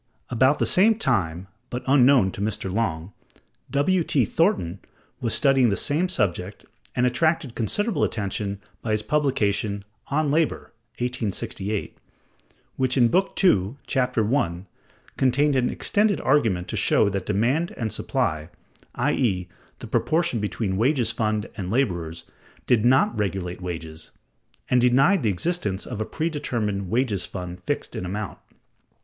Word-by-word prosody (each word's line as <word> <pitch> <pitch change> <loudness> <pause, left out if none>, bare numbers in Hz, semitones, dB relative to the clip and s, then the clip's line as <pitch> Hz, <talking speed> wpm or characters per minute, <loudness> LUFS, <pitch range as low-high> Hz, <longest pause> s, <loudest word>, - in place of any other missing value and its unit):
About 130 +4 +3
the - - +1
same 220 +5 +4
time 95 - -1 0.2
(but 125 - -4
unknown 130 -6 +5
to 100 - -7
Mr. 105 -2 -2
Longe), 90 -5 -2 0.6
W. 175 +6 +2
T. 140 -6 +2
Thornton 160 - 0 0.4
was 115 - -2
studying 135 -4 +4
the 100 - 0
same 165 +6 0
subject, 100 - -2 0.3
and 125 - +2
attracted 140 +1 +1
considerable 180 - -1
attention 100 -1 -2 0.2
by 110 - -1
his 110 0 0
publication, 105 -9 0 0.2
"On 145 0 0
Labor" 160 +1 0 0.2
(1868), 110 -4 -3 0.8
which 130 0 +1
in 120 -2 +5
Book 190 +6 +1
II, 105 - +3
Chap. 130 -3 0
I, 105 -6 0 0.5
contained 140 +3 +2
an 125 -1 +2
extended 210 0 +1
argument 110 -11 +2
to - - -3
show - - +3
that 100 -1 -4
demand 130 - +1
and 110 -3 -2
supply 80 -2 -2 0.5
(i.e., 120 -9 0 0.3
the - - -9
proportion 160 -6 0
between 105 -2 -2
wages 120 0 +2
fund 110 -2 -1
and 95 -4 -5
laborers) 85 -9 -1 0.4
did 115 -2 +3
not 130 -1 +4
regulate 95 -3 -2
wages, 80 -2 -7 0.6
and 125 -1 +3
denied 135 +10 +4
the 110 - +1
existence 100 - -1
of 115 -4 -5
a - - -1
predetermined 115 - -2
wages 115 -3 0
fund 90 -1 -7
fixed - - -4
in - - -3
amount. 100 +2 -5
115 Hz, 140 wpm, -24 LUFS, 100-140 Hz, 0.8 s, unknown